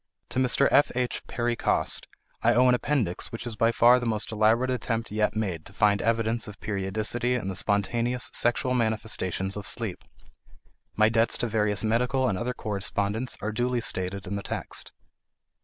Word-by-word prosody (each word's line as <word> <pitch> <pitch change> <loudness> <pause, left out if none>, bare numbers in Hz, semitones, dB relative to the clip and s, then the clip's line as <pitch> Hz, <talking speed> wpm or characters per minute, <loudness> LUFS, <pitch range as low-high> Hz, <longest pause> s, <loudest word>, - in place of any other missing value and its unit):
To - - -2
Mr. 130 +2 +4
F.H. 125 -3 +1
Perry 120 0 -1
Coste - - 0 0.3
I - - +3
owe 125 +1 +5
an 125 - +5
appendix 125 -9 -1
which 115 - -6
is 120 -2 -4
by 115 +1 +3
far 120 +2 +5
the 120 - -3
most 110 -1 -1
elaborate 110 +4 +2
attempt 115 -2 -2
yet 105 0 0
made 95 -7 -2
to 100 - -14
find 105 -1 +3
evidence 115 0 0
of 105 -1 -10
periodicity 110 +5 -1
in 105 -6 -3
the 95 - -4
spontaneous 115 +6 -1
sexual 120 +2 +2
manifestations 110 -5 -1
of 105 -1 -6
sleep; 110 -6 -3 0.9
my 110 0 +5
debts 115 +1 +3
to 120 - -1
various 105 -2 0
medical 125 +4 +1
and 100 - 0
other 125 +7 -3
correspondents 105 +3 -2
are 110 - -1
duly 120 +2 0
stated 95 -2 -2
in 100 +1 -4
the - - -4
text. - - -3
115 Hz, 175 wpm, -27 LUFS, 105-120 Hz, 0.9 s, owe